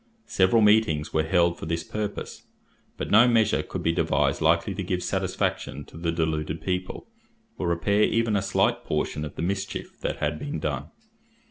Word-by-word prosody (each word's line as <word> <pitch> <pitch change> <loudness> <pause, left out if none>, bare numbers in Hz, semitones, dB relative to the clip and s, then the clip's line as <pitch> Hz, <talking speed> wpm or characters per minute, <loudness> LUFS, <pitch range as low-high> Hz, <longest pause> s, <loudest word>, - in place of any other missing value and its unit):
Several 95 +4 +3
meetings 105 -8 +3
were 80 - +3
held 85 +1 +2
for - - -6
this 85 +1 -2
purpose; 105 -1 -5 0.5
but - - -4
no 110 +4 +7
measure 115 -3 +3
could - - -6
be 80 - +2
devised 70 -3 +1
likely 85 +5 +2
to 100 - -4
give 90 -1 -2
satisfaction 70 +1 -2
to - - -17
the 85 +1 -2
deluded 80 -1 -1
people, 90 +2 -3 0.5
or 90 - -1
repair 85 +5 +1
even 115 0 +2
a 100 - +2
slight 95 - +1
portion 75 - -2
of 75 - -7
the - - -4
mischief 95 +2 -4
that - - -2
had 75 +1 -2
been 145 +1 -4
done. - - -3
85 Hz, 175 wpm, -26 LUFS, 80-100 Hz, 0.5 s, no